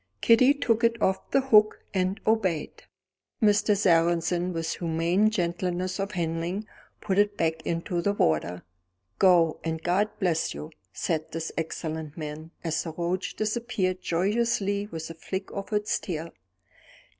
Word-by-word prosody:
Kitty 255 +5 +5
took 235 -5 +1
it 230 0 +3
off 190 -2 0
the 275 - +3
hook, 215 -5 +5
and 190 +1 0
obeyed. 195 -8 0 0.5
Mr. 210 -1 +3
Sarrazin 175 -1 +2
with 165 -1 -2
humane 170 +5 +2
gentleness 180 -1 -2
of 195 +2 -2
handling 170 +3 -2 0.4
put 195 -1 0
it 205 0 +2
back 160 -1 0
into 170 +1 -1
the 200 +3 +1
water. 85 - 0 0.6
"Go, 175 -4 +4
and 160 0 -3
God 190 +4 +2
bless 175 -4 0
you," 155 - -7 0.2
said 160 -2 -2
this 165 0 -4
excellent 160 -1 -4
man, 155 0 -6
as 160 -2 0
the 165 - -6
roach 180 +2 -2
disappeared 215 -4 -1
joyously 200 +2 0
with 160 -5 -6
a - - -7
flick 190 +4 -5
of 200 +1 -6
its 210 0 0
tail. 165 -3 -5
180 Hz, 145 wpm, -27 LUFS, 165-205 Hz, 0.6 s, Kitty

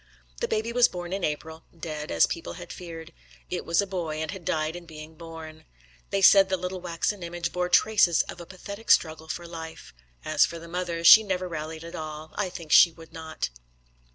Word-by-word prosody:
The - - -1
baby 220 +2 -1
was 245 0 +6
born 175 0 -6
in 195 -1 -3
April 160 +2 -3 0.2
dead, 155 -2 -5
as 85 - +4
people 85 - -5
had - - -9
feared. 165 -2 -9 0.4
It - - -3
was 170 +4 +3
a - - -3
boy, 175 -5 -4
and 160 +1 -3
had 190 -3 -8
died 155 +1 -1
in 175 -1 -9
being 155 0 -10
born. 160 -1 -10 0.5
They 195 -1 0
said 195 0 +8
the 190 - +1
little 180 +1 -5
waxen 180 +3 -2
image 170 0 -4
bore 180 0 -1
traces 185 -4 +4
of 175 - -9
a 170 - -10
pathetic 200 +4 -9
struggle 160 -1 +3
for 175 +2 -5
life. 160 -1 -9 0.3
As - - +4
for 170 - -1
the 165 0 -10
mother, 170 -1 -3
she 215 +6 +10
never 185 -3 -2
rallied 160 -1 -6
at 170 - -9
all; 155 0 -7
I 200 -2 -2
think 165 -3 -9
she 170 - +8
would 165 0 -15
not. 160 - -5
170 Hz, 210 wpm, -26 LUFS, 160-180 Hz, 0.5 s, she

